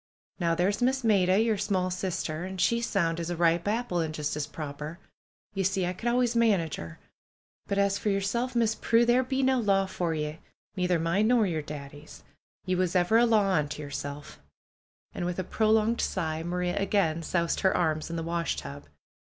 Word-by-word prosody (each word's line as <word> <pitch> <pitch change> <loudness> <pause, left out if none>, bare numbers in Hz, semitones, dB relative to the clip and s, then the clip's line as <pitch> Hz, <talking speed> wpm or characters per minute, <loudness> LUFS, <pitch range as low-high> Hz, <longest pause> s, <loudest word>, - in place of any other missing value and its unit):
Now 170 -2 +1
there's 195 +6 0
Miss 260 +1 +1
Maida, 195 -3 +3
yer 225 -1 +2
small 190 -2 0
sister, 175 -3 -3
an' 190 +1 -6
she's 235 +6 +1
sound 170 -4 0
as 170 0 -3
a 175 - -2
ripe 170 +1 +2
apple, 215 -4 0
an' 160 -1 -3
just 150 -1 -3
as 150 -1 -3
proper. 150 +2 -7 0.6
You 195 -1 -1
see, 190 -1 +1
I 180 - -2
could 225 +6 -5
always 245 -1 +1
manage 200 -9 +2
'er. 80 -1 -8 0.7
But 200 - -1
as 200 0 +2
for 210 - -1
yerself. 220 +6 -1
Miss 230 -2 +2
Prue, 230 +1 +2
there 240 +2 +4
be 265 +1 -1
no 260 -1 +3
law 195 -3 +2
for 175 -3 -2
ye; 150 +1 -4 0.4
neither 180 -2 +1
mine 170 +6 +1
nor 240 -2 +4
yer 165 -5 -1
Daddy's. 145 0 -10 0.4
Ye 185 - 0
was 185 -1 0
ever 180 +6 +4
a 240 - +4
law 210 -4 +3
unto 150 -3 -1
yerself," 145 0 -7 0.7
and - - -4
with 175 0 -2
a 185 - -1
prolonged 220 +3 +2
sigh, 160 -4 -2
Maria 175 +1 -2
again 195 -5 +1
soused 170 0 -1
her 190 - +2
arms 155 -2 0
in 170 - -4
the 165 - -3
washtub. 165 - -3
185 Hz, 195 wpm, -28 LUFS, 165-215 Hz, 0.7 s, there